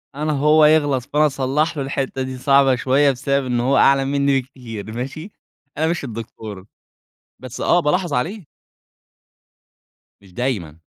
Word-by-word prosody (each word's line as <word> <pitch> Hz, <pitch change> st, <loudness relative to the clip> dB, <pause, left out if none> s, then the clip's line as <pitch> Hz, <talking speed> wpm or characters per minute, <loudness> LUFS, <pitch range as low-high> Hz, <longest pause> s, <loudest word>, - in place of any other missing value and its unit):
أنا 150 Hz, +1 st, -1 dB
هو 150 Hz, +2 st, +4 dB
يغلط 145 Hz, -5 st, +3 dB
فأنا 150 Hz, +3 st, +1 dB
أصلّح 150 Hz, +3 st, -1 dB
له، 140 Hz, -, -1 dB
الحتة 135 Hz, -1 st, -3 dB
دي 130 Hz, 0 st, -4 dB
صعبة 135 Hz, 0 st, +4 dB
شوية 135 Hz, +3 st, +2 dB
بسبب 140 Hz, +1 st, -1 dB
إن 120 Hz, -1 st, -1 dB
هو 135 Hz, +3 st, +2 dB
أعلى 135 Hz, 0 st, +4 dB
منّي 140 Hz, -1 st, +1 dB
بكتير، 115 Hz, -5 st, -9 dB
ماشي؟ 135 Hz, -, -6 dB, 0.5 s
أنا 160 Hz, +1 st, +1 dB
مش 170 Hz, -3 st, -2 dB
الدكتور، 110 Hz, -4 st, -8 dB, 0.7 s
بس 130 Hz, -2 st, -8 dB
آه، 175 Hz, -, +3 dB
بالاحظ 170 Hz, 0 st, 0 dB
عليه. 175 Hz, -, -2 dB, 1.8 s
مش 95 Hz, -2 st, -19 dB
دايمًا، 90 Hz, -, -3 dB
135 Hz, 145 wpm, -20 LUFS, 125-150 Hz, 1.8 s, هو